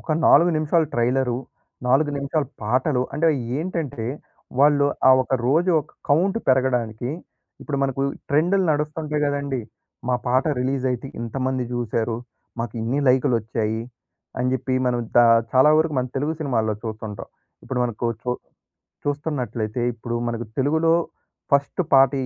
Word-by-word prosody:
ఒక 155 - -2
4 170 +4 +6
నిమిషాలు 155 +1 +2
ట్రైలరు, 125 +1 +1 0.5
4 145 +4 +3
నిమిషాల 140 +2 -1 0.2
పాటలు 125 +4 +1
అంటేవి 155 0 +2 0.2
ఏంటంటే, 160 -9 -3 0.5
వాళ్ళు 145 0 +5 0.2
ఆ - - +9
ఒక 130 - -1
రోజు 165 +7 +3
ఒక 150 - -13 0.2
కౌంట్ 185 +9 +3
పెరగడానికి, 125 -2 +1 0.5
ఇప్పుడు 145 - -3
మనకు 135 0 0 0.3
ట్రెండులు 180 +7 +3
నడుస్తుంటాయి 150 0 -2
కదండీ! 140 -3 -2 0.5
మా 125 - +3
పాట 130 +2 +2 0.2
రిలీజయితే 130 -1 -1
ఇంతమంది 130 +2 -2
చూసారు. 115 -1 -1 0.4
మాకిన్ని 115 +3 -2
లైకులోచ్చాయి. 115 -4 +1 0.6
అని 125 0 +1
జెప్పి 130 0 -1
మనం 120 -1 +1 0.2
దా 120 - +8 0.3
చాలా 130 +4 +6
వరకు 155 -2 +1
మన 125 - 0
తెలుగు 145 +4 0
సినిమాల్లో 115 -7 0
చూస్తుంటాం. 110 -2 -6 0.4
ఇప్పుడు 130 - -3
మనకు 120 0 -2 0.2
చూ 125 - -2 0.7
చూస్తున్నట్లయితే, 125 -6 -2
ఇప్పుడు 120 +1 -5
మనకు 120 0 -3
తెలుగులో 160 +4 +3 0.6
ఫస్ట్ 140 +6 +2
పాట 135 -1 +7
130 Hz, 125 wpm, -23 LUFS, 120-150 Hz, 0.7 s, ఆ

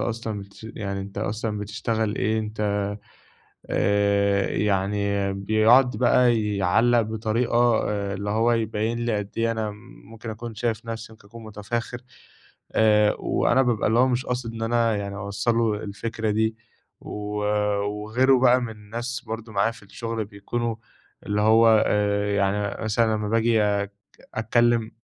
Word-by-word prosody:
أصلًا 110 -3 -3
بتش 100 +2 -13
يعني 100 -2 -4
أنت 100 +1 -7
أصلًا 105 0 -2
بتشتغل 110 +1 -2
إيه؟ 110 +2 0
أنت" 110 0 -5 1.1
آآ 100 0 +2
يعني 100 0 0
بيقعُد 110 +6 +4
بقى 120 -2 +3
يعلَّق 115 +6 +3
بطريقة 110 +2 -1 0.3
آآ 100 -1 -2
اللي 100 +1 -4
هو 115 +2 +2
يبيّن 110 0 -1
لي 120 -2 0
قد 100 0 -5
إيه 115 0 +1
أنا 110 -2 -2
م - - -10 0.4
ممكن 115 0 -8
أكون 115 +1 -7
شايف 115 0 -2
نَفْسي 115 0 -6
ممكن 105 -2 -18
أكون 115 +1 -11
مُتَفاخر 110 +3 -4 0.7
آآ 105 -1 +4
وأنا 135 - +2
بابقى 120 -5 +1
اللي 115 - +2
هو 130 - +4
مش 125 0 -1
قاصد 120 -2 -3
إن 115 - -6
أنا 115 -1 +1
يعني 100 0 -4
أوصّل 105 +3 -1
له 115 -2 +2
الفكرة 110 +2 -3
دي 110 +1 0 0.4
و - - -10 0.7
وغيره 110 +6 +2
بقى 125 0 +5
من 120 -2 -4
الناس 115 +5 -5
برضه 110 0 -6
معايا 100 +3 +2
في 115 - -16
الشُغل 115 +2 -4
بيكونوا 110 +3 -4 0.5
اللي 105 0 0
هو 110 +2 +5 0.2
آآ 105 0 +1
يعني 100 +1 -1
مثلًا 110 0 +2
لمّا 105 -1 -3
باجي 115 0 +2
أك 100 -1 +1 0.5
أتكلِّم 115 0 +2
110 Hz, 150 wpm, -24 LUFS, 105-115 Hz, 1.1 s, بقى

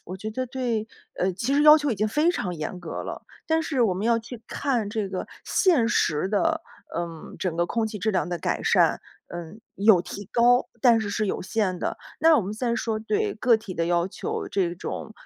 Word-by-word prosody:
我 185 - -7
觉 215 +3 -5
得 255 +4 -3
对 240 -4 -2 0.3
呃， 185 - +1
其 235 +9 -1
实 290 - +4
要 300 0 +9
求 295 -2 0
已 - - +1
经 215 +1 0
非 300 +9 +3
常 185 - -3
严 160 +3 -5
格 170 -2 -5
了， - - -7 0.2
但 320 0 +2
是 275 -6 0
我 215 -5 +3
们 190 +4 -2
要 230 -1 +3
去 230 0 -9
看 250 -7 -1
这 210 -1 -2
个 185 - -4 0.2
现 330 - +3
实 175 -7 +1
的， 325 +11 +1 0.3
嗯， 170 -2 -5
整 180 -4 -2
个 170 +1 +1
空 225 +4 0
气 215 -1 -6
质 220 +3 0
量 190 - 0
的 175 -1 -3
改 - - -2
善， - - +3 0.3
呃， 170 -2 -7 0.2
有 200 -2 +5
提 200 +3 -8
高， 245 +1 +4
但 235 -2 +6
是 210 -2 -3
是 215 +1 -1
有 - - -2
限 185 0 -1
的。 - - -3 0.2
那 320 0 +6
我 - - +3
们 195 +2 -4
先 235 +1 -1
说 225 -1 -1
对 415 - -1
个 245 -2 +4
体 200 -4 -8
的 165 - 0
要 175 0 +2
求， - - -4
这 185 -4 0
种， 185 +4 -6
215 Hz, 240 characters per minute, -25 LUFS, 185-250 Hz, 0.3 s, 要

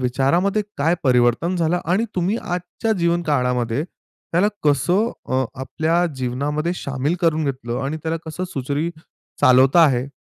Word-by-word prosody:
विचारामध्ये 155 - +1
काय 160 +5 +2
परिवर्तन 125 +7 +2
झालं 170 +1 +1
आणि 185 +7 +1
तुम्ही 185 +5 0
आजच्या 180 +5 -3
जीवनकाळामध्ये 140 -7 0
त्याला 180 +2 -3 0.2
कसं 175 - +2 0.2
अ, 130 0 +1 0.2
आपल्या 160 +6 0
जीवनामध्ये 145 +6 -2
सामील 140 +1 -2
करून 160 -2 +2
घेतलं 130 -3 -3
आणि 150 +3 -2
त्याला 160 0 -1
कसं 170 +4 -4
सुरळीत 145 +3 -2
अ, - - -17 0.4
चालवता 135 +4 +6
आहे? 130 -3 +1
155 Hz, 135 wpm, -21 LUFS, 130-175 Hz, 0.4 s, चालवता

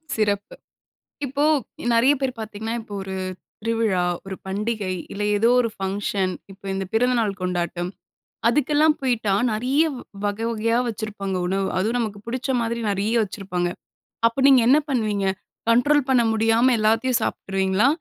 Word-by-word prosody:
சிறப்பு! 205 -2 -1 0.7
இப்போ, 280 +2 0 0.5
நெறைய 235 +5 +5
பேர் 265 -1 0
பார்த்தீங்கன்னா, 220 +1 -4
இப்ப 220 -2 -13
ஒரு 190 0 -6 0.5
திருவிழா, 225 -5 +1 0.2
ஒரு 195 0 -5
பண்டிகை, 205 0 -2 0.2
இல்ல 205 +1 -3
ஏதோ 230 +3 +3
ஒரு 230 - -1
ஃபங்ஷன். 195 -1 -1 0.2
இப்ப 195 +1 -16
இந்த 195 0 -2
பிறந்தநாள் 225 -4 +1
கொண்டாட்டம். 175 -1 -2 0.6
அதுக்கெல்லாம் 300 +4 +3
போய்ட்டா, 235 -7 +1 0.2
நெறைய 260 +8 +2 0.4
வகை 205 +2 -1
வகையா 230 +1 +1
வச்சிருப்பாங்க 205 -4 -4
உணவு. 195 +1 0
அதுவும் 225 +6 0
நமக்கு 210 -3 -3
பிடிச்ச 255 +3 -3
மாதிரி 235 0 -2
நெறைய 200 +3 0
வச்சிருப்பாங்க! 185 -3 -3 0.6
அப்ப 235 +4 -1
நீங்க 265 -3 +7
என்ன 275 +4 +6
பண்ணுவீங்க? 215 -6 0 0.4
கண்ட்ரோல் 270 +4 +4
பண்ண 250 -2 +5
முடியாம 225 +3 +3
எல்லாத்தையும் 225 +3 +2
சாப்பிட்டுருவீங்களா? 195 +4 +1
220 Hz, 135 wpm, -23 LUFS, 195-240 Hz, 0.7 s, நீங்க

